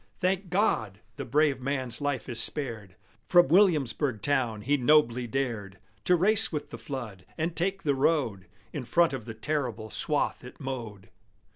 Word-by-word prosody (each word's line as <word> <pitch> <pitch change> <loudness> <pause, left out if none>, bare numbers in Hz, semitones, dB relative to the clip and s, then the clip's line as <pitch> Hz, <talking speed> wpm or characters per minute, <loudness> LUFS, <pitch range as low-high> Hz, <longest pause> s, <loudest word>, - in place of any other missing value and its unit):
Thank 185 0 0
God! 110 - +1 0.2
the - - -4
brave 145 0 +2
man's 130 -1 -3
life 140 -5 -2
is 120 -3 -3
spared! 115 -9 -3 0.3
From 175 -5 +6
Williamsburg 150 - +3
town 125 -7 0
he 140 +6 +2
nobly 125 -3 +3
dared 110 -6 -3 0.3
To 180 - +5
race 215 +5 +2
with 150 -2 -4
the - - -7
flood, 115 -9 -6
and 165 +1 -1
take 195 +3 -1
the 145 - +2
road 130 - +1 0.3
In 145 - -4
front 170 +5 +3
of 125 -5 -5
the 115 -2 -7
terrible 120 -4 -3
swath - - -1
it - - -11
mowed. 115 -7 -6
135 Hz, 160 wpm, -28 LUFS, 115-155 Hz, 0.3 s, From